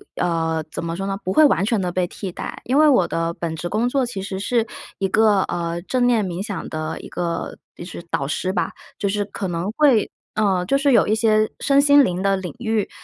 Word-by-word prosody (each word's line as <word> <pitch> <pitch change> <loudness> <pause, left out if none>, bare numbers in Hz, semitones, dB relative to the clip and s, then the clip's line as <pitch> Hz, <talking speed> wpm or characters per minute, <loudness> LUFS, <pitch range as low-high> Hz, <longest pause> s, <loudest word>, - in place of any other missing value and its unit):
呃， 165 -2 0
怎 - - -5
么 165 0 -3
说 195 +1 -3
呢？ 195 0 -2
不 185 - -2
会 310 - +5
完 280 - +3
全 215 +1 +1
的 180 -2 -1
被 180 +1 0
替 185 +2 -6
代， - - -6
因 260 +3 +1
为 310 0 +6
我 250 -11 +4
的 165 0 -1
本 165 -2 -4
职 175 +2 -4
工 220 +5 +1
作 265 0 +1
其 235 -5 -5
实 190 0 -5
是 230 +2 +1 0.3
一 195 - 0
个， 210 0 +4
呃， 170 0 -3
正 250 +5 +1
念 235 -4 +3
冥 180 +1 -4
想 200 -6 -5
的 155 0 -4
一 - - -9
个 170 -1 -4 0.2
就 170 - -8
是 170 -1 -8
导 135 - -1
师 185 +5 -1
吧， - - -1 0.3
就 200 - -1
是 205 +1 0
可 200 -1 -5
能 175 +3 -2
会 275 -8 +4 0.2
呃， 195 -4 +1
就 275 +9 +2
是 280 0 +2
有 245 - +4
一 215 - +2
些 215 -1 +3
身 275 0 +4
心 285 0 +6
灵 180 -6 -1
的 195 0 +2
领 190 -2 -5
域， 220 -3 -1
195 Hz, 260 characters per minute, -21 LUFS, 175-230 Hz, 0.3 s, 为